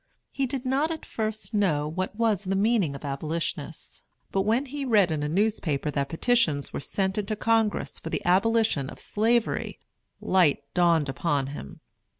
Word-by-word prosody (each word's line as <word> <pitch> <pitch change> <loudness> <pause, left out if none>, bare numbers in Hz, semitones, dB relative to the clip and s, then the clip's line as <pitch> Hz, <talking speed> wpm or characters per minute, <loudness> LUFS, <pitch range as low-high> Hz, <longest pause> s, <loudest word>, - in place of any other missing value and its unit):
He 275 -1 -1
did 260 0 -4
not 275 +5 +1
at 320 -1 -5
first 220 0 -4
know 165 -8 +1
what 185 +6 -3
was 215 -3 +1
the 195 +1 0
meaning 200 -7 +2
of 140 - -8
"abolitionists"; 155 +4 -4 0.3
but 195 - +1
when 225 +7 +1
he 285 +1 -5
read 210 -9 +3
in 155 -2 -1
a 150 - -1
newspaper 165 -6 0
that 140 -1 -1
petitions 165 - +1
were - - -2
sent 190 +7 -1
into 210 +1 -2
Congress 225 0 0
for - - -6
the - - -3
abolition 195 -6 +2
of - - -10
Slavery, 225 +2 0 0.4
light 175 -7 +3
dawned 170 -4 +3
upon 140 0 -1
him. 70 - -9
195 Hz, 165 wpm, -26 LUFS, 155-225 Hz, 0.4 s, read